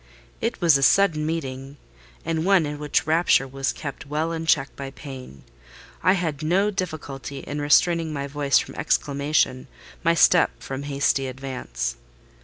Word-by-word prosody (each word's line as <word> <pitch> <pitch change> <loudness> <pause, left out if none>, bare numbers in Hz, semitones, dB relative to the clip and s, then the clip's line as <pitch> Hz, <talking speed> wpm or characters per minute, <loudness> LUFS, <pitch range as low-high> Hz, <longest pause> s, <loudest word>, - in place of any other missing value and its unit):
It 230 +1 -2
was 165 -5 +5
a - - -3
sudden 155 -1 +3
meeting, 135 -3 -5 0.5
and 160 -1 -1
one 190 -3 +4
in 145 0 -5
which 150 -1 0
rapture 160 -3 +3
was 135 0 -2
kept 140 -2 -7
well 155 +3 -1
in 165 -1 -4
check 140 -3 +2
by 140 -1 -6
pain. 130 - -10 0.6
I 185 +3 +4
had 160 -6 -2
no 190 +7 +2
difficulty 145 -7 -5
in 145 0 -5
restraining 165 +2 +3
my 140 -2 -3
voice 140 0 +1
from - - -2
exclamation, 140 -3 0 0.4
my 170 +1 +3
step 175 +1 +4
from 135 0 -5
hasty 140 -1 +1
advance. 125 - -5
145 Hz, 155 wpm, -24 LUFS, 135-165 Hz, 0.6 s, was